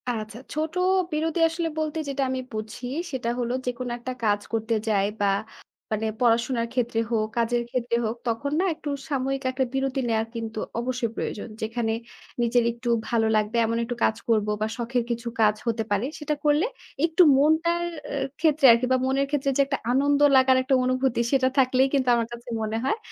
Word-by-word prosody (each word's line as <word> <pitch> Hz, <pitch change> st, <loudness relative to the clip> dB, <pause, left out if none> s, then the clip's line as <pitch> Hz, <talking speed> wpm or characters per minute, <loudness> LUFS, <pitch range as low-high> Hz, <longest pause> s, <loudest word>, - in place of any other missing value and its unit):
আচ্ছা। 220 Hz, -1 st, -4 dB
ছোট 310 Hz, +1 st, -2 dB, 0.4 s
বিরতি 320 Hz, +2 st, -1 dB
আসলে 330 Hz, +1 st, -2 dB
বলতে 310 Hz, 0 st, -2 dB
যেটা 275 Hz, 0 st, -1 dB
আমি 260 Hz, 0 st, -1 dB
বুঝি, 215 Hz, +3 st, -5 dB, 0.2 s
সেটা 250 Hz, -4 st, -2 dB
হল 240 Hz, -1 st, -1 dB, 0.2 s
যেকোনো 250 Hz, 0 st, -3 dB
একটা 255 Hz, +2 st, -5 dB
কাজ 205 Hz, -1 st, +2 dB
করতে 225 Hz, 0 st, 0 dB
যায় 200 Hz, -2 st, +2 dB
বা -, -, +3 dB, 0.7 s
মানে 215 Hz, 0 st, -1 dB, 0.2 s
পড়াশোনার 235 Hz, 0 st, +2 dB
ক্ষেত্রে 240 Hz, -2 st, 0 dB
হোক, 215 Hz, -2 st, +1 dB
কাজের 235 Hz, +1 st, +1 dB
ক্ষেত্রে 240 Hz, -1 st, -1 dB
হোক, 220 Hz, +1 st, -2 dB
তখন 235 Hz, +5 st, -1 dB
না? 375 Hz, -, +2 dB
একটু 300 Hz, -, -6 dB, 0.2 s
সাময়িক 270 Hz, -1 st, -1 dB
একটা 260 Hz, 0 st, 0 dB
বিরতি 270 Hz, 0 st, 0 dB
নেয়ার 220 Hz, -1 st, +1 dB
কিন্তু 225 Hz, -1 st, -4 dB, 0.2 s
অবশ্যই 240 Hz, -1 st, -2 dB
প্রয়োজন। 210 Hz, -, -4 dB
যেখানে 225 Hz, 0 st, -1 dB, 0.5 s
নিজের 240 Hz, 0 st, +3 dB
একটু 235 Hz, +1 st, -5 dB, 0.2 s
ভালো 225 Hz, -2 st, +2 dB
লাগবে 215 Hz, +2 st, +1 dB
এমন 230 Hz, +1 st, -1 dB
একটু 245 Hz, +1 st, -4 dB
কাজ 220 Hz, -, +3 dB
করব 215 Hz, -2 st, +3 dB
বা 215 Hz, -, +1 dB
শখের 240 Hz, 0 st, -1 dB
কিছু 235 Hz, 0 st, -3 dB
কাজ 210 Hz, -1 st, +4 dB
হতে 225 Hz, -1 st, 0 dB
পারে 205 Hz, +3 st, +1 dB
সেটা 300 Hz, 0 st, -1 dB
করলে, 295 Hz, +5 st, +4 dB, 0.4 s
একটু 335 Hz, +2 st, +4 dB
মনটার 325 Hz, +4 st, +3 dB, 0.3 s
এ -, -, -3 dB, 0.2 s
ক্ষেত্রে 310 Hz, -3 st, +3 dB
আরকি 235 Hz, +2 st, +3 dB
বা 260 Hz, -, +5 dB
মনের 270 Hz, +1 st, +1 dB
ক্ষেত্রে 280 Hz, -1 st, 0 dB
যে -, -, +5 dB
একটা 275 Hz, 0 st, -2 dB
আনন্দ 285 Hz, +2 st, +3 dB, 0.2 s
লাগার 260 Hz, 0 st, +5 dB
একটা 265 Hz, +1 st, +2 dB
অনুভূতি, 255 Hz, -1 st, +1 dB
সেটা 265 Hz, -2 st, +3 dB
থাকলেই 260 Hz, 0 st, +4 dB
কিন্তু 265 Hz, -2 st, +1 dB
আমার 230 Hz, -1 st, 0 dB
কাছে 235 Hz, +1 st, -10 dB
মনে 220 Hz, 0 st, -2 dB
হয়, 270 Hz, +11 st, +1 dB
245 Hz, 185 wpm, -25 LUFS, 230-275 Hz, 0.7 s, বা